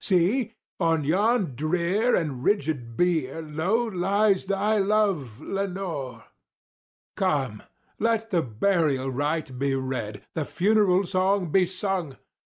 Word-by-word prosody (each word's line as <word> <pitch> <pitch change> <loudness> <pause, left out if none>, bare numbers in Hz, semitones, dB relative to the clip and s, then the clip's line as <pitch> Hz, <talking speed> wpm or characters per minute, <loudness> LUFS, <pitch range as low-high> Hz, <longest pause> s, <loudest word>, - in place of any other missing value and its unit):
See! 210 +6 +1 0.2
on 165 -3 +2
yon 195 - +1
drear 180 - +1
and 140 -7 -2
rigid 140 - -1
bier 165 -5 +1
low 160 +10 0
lies 200 -1 +1
thy 200 +2 +1
love, 195 - +1
Lenore! 175 - -4 0.9
Come! 135 - 0 0.4
let 225 0 0
the 175 -3 +3
burial 135 - 0
rite 145 -1 -2
be 140 0 +1
read—the 130 +2 -4
funeral 195 +4 +2
song 185 -1 +1
be 185 0 +4
sung! 185 -6 -3
175 Hz, 110 wpm, -25 LUFS, 140-200 Hz, 0.9 s, be